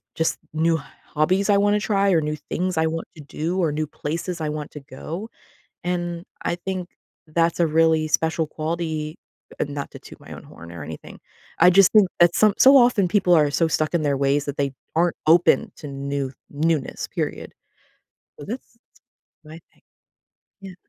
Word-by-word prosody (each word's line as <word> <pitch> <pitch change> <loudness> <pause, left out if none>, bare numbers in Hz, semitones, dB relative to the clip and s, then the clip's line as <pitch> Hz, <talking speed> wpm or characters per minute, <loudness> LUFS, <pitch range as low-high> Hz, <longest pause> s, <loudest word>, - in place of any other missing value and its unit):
just 160 - 0 0.2
new 160 +1 +2 0.4
hobbies 185 +7 +2
I 200 - +5
wanna 205 +1 +3
try 200 -2 +1
or 165 -3 +3
new 150 0 -2
things 180 +3 -3
I 160 - +3
want 165 +1 -3
to 155 - -10
do 165 +6 -3
or 165 -4 +1
new 155 0 -2
places 165 +4 -4
I 155 - -1
want 150 -1 -5
to 150 - -8
go, 160 +9 -7 0.6
and 175 -1 -3 0.2
I 170 - -1
think 185 0 -5 0.4
that's 165 +2 +1
a 170 - +4
really 160 0 +2
special 160 +1 +1
quality- 155 -1 -4 0.5
not 145 -1 -5
to - - -9
toot - - -13
my - - -13
own - - -9
horn 85 +1 -13
or 85 - -8
anything- 80 +1 -10 0.4
I 180 - +8
just 195 +1 +5
think 210 -4 +6
that 175 0 +5
some 215 -2 +4
so 270 +1 +8
often 240 -7 +5
people 180 -2 +3
are 150 -3 +4
so 165 +2 +2
stuck 155 +2 -1
in 170 - +2
their 145 -2 +1
ways 140 +1 +1
that 145 - -4
they 140 -1 -1 0.2
aren't 170 0 +2
open 175 +6 +4
to 150 - -9
new 140 -1 -4 0.2
newness, 150 -1 -1
period. - - -4 0.9
So 145 - -8
that's 240 +2 -7
t 230 - -33 0.7
my 160 +2 -11
thing. - - -31 0.8
Yeah. 190 -2 -10
165 Hz, 185 wpm, -23 LUFS, 150-180 Hz, 0.9 s, I